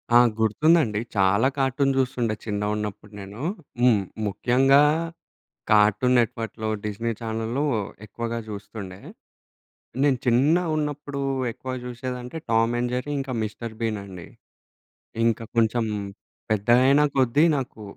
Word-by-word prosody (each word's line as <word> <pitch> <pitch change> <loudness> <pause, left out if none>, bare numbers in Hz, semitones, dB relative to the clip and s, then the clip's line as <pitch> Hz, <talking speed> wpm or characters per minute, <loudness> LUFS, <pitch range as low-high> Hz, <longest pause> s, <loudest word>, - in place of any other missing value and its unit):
ఆ! - - +10 0.2
గుర్తుందండి. 110 0 +3 0.2
చాలా 100 +6 +3
కార్టూన్ 135 +1 +1
చూస్తుండే 125 -4 0
చిన్నగున్నప్పుడు 105 0 -3
నేను. 100 +4 -9 0.4
హ్మ్. 120 -5 +4 0.3
ముఖ్యంగా 130 +7 +4 0.9
కార్టూన్ 105 +4 +4
నెట్ 115 -3 +2
వర్క్‌లో 110 -1 -4 0.2
డిస్ని 110 +2 -2
ఛానల్‌లు 115 +4 -2 0.4
ఎక్కువగా 115 +2 -4
చూస్తుండే. 100 -2 -8 1.0
నేను 140 -3 +3
చిన్నగున్నప్పుడు 150 +1 +1 0.3
ఎక్కువ 130 +3 -7
చూసేది 125 +1 -5
అంటే 125 +6 -8
టామ్ 115 +1 +3
అండ్ 120 0 -1
జెర్రీ 130 +4 -3
ఇంకా 135 -1 -4
మిస్టర్ 110 +1 -5
బీన్ 110 -2 -1
అండి. 90 -3 -10 1.0
ఇంకా 115 0 +1
కొంచెం 115 +1 +2 0.7
పెద్దగైన 125 +7 +4
కొద్దీ 135 +3 +4
నాకు 130 -5 -5
115 Hz, 110 wpm, -24 LUFS, 105-130 Hz, 1.0 s, ఆ